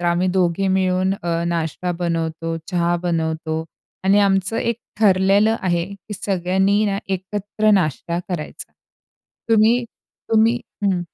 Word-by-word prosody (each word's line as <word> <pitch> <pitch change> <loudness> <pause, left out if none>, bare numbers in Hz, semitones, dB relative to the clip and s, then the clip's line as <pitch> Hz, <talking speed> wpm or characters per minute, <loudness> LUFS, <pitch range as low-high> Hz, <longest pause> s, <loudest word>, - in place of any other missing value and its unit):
तर 175 - -4
आम्ही 175 +2 +2
दोघे 180 +2 +1
मिळून 185 0 +1
अ, 170 0 -1
नाश्ता 170 +1 -2
बनवतो 165 -1 -2
चहा 175 -1 +1
बनवतो 160 -1 -1 0.4
आणि 195 +2 +5
आमचं 195 +1 +2
एक 235 -1 0 0.2
ठरलेलं 200 +2 +4
आहे 175 -2 +1
की 200 +2 -11
सगळ्यांनी 190 +2 +1
ना, 200 -1 0
एकत्र 205 +3 -1
नाश्ता 170 -2 +1
करायचा 170 -4 -6 0.8
तुम्ही, 225 +2 +4 0.5
तुम्ही 225 +2 +4 0.3
हं. 190 -3 +2
185 Hz, 125 wpm, -21 LUFS, 170-200 Hz, 0.8 s, आणि